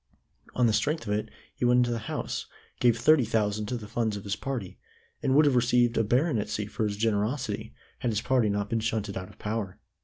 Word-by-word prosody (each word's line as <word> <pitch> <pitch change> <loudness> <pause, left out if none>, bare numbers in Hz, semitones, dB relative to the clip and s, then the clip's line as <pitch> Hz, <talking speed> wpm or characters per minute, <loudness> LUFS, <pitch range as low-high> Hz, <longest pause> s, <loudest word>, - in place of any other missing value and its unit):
On 125 - +3
the 110 - +3
strength 150 +8 0
of 105 - -1
it 105 - -2 0.2
he - - -6
went 125 0 +5
into 120 -1 +3
the 115 - -1
House, - - -3 0.3
gave 120 -2 +4
thirty 145 +4 +5
thousand 105 -2 0
to 125 - -2
the 105 -3 -9
funds 110 -1 -1
of 100 - -8
his 100 0 -2
party, 115 -4 -5 0.4
and 135 - +2
would 150 +1 +6
have 140 -3 +3
received 120 0 +3
a 115 - +3
baronetcy 115 -3 0
for 110 +2 -2
his 100 -1 -2
generosity, 110 +2 -1 0.2
had 125 - -1
his 105 -2 0
party 125 -4 +2
not 100 0 -1
been 115 +2 0
shunted 110 -2 -2
out 90 -1 -5
of - - -17
power. 105 -3 -4
115 Hz, 220 wpm, -28 LUFS, 105-125 Hz, 0.4 s, would